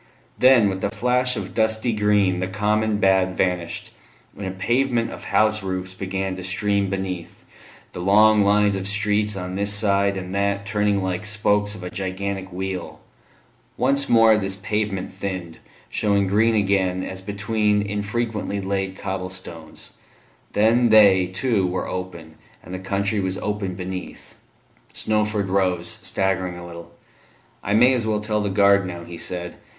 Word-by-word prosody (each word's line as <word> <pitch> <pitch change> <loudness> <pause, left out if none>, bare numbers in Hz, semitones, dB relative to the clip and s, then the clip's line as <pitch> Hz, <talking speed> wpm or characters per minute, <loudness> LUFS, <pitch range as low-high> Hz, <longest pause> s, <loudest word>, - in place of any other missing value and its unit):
Then, 125 -4 +6
with 95 -1 -3
a - - +1
flash 125 +1 +1
of - - -6
dusty 110 +1 +1
green, 105 -3 +2
the 90 - -1
Common 105 +2 0
had 95 -1 +3
vanished, 90 -2 -2 0.4
and 100 - -6
a - - -3
pavement 120 +5 0
of - - -9
house 110 0 +2
roofs 95 -1 -4
began 95 0 -3
to 95 - -7
stream 100 +1 0
beneath, 95 -3 -5 0.5
the - - -8
long 105 +4 +5
lines 105 0 +3
of 95 0 -3
streets 105 +1 +1
on 90 -1 -5
this 100 +2 -1
side 100 -1 +2
and 90 0 -6
that 100 0 0
turning 105 -1 0
like 95 +1 -2
spokes 105 0 +1
of 95 - -10
a 90 - -6
gigantic 95 0 -4
wheel; 95 0 -5 0.8
once 140 +2 +1
more 115 -2 +6
this 95 -1 -1
pavement 100 -2 -3
thinned, 90 -4 -5 0.3
showing 100 -2 +1
green 110 +4 +2
again 95 -3 +1
as 95 0 -6
between 105 +1 0
infrequently 105 +1 -3
laid 95 -1 -3
cobble 95 -1 -4
stones; 85 -3 -9 0.6
then 115 +3 +3
they, 100 -4 +6
too, 95 +1 0
were 90 +1 -2
gone, 90 -3 -6 0.3
and 90 - -10
the 95 - -4
country 100 +2 -1
was 95 0 -1
open 105 -3 -3
beneath. 90 0 -7 0.6
Snowford 105 -2 0
rose, 90 -3 0
staggering 95 -2 -1
a 85 - -9
little. 85 -1 -10 0.7
"I 100 - 0
may 125 +4 +6
as 120 -3 -1
well 105 -1 +1
tell 105 0 -1
the 100 - -1
guard 100 -1 +4
now," 85 -1 -7
he 85 0 -9
said. 90 -1 -5
100 Hz, 155 wpm, -22 LUFS, 95-105 Hz, 0.8 s, Then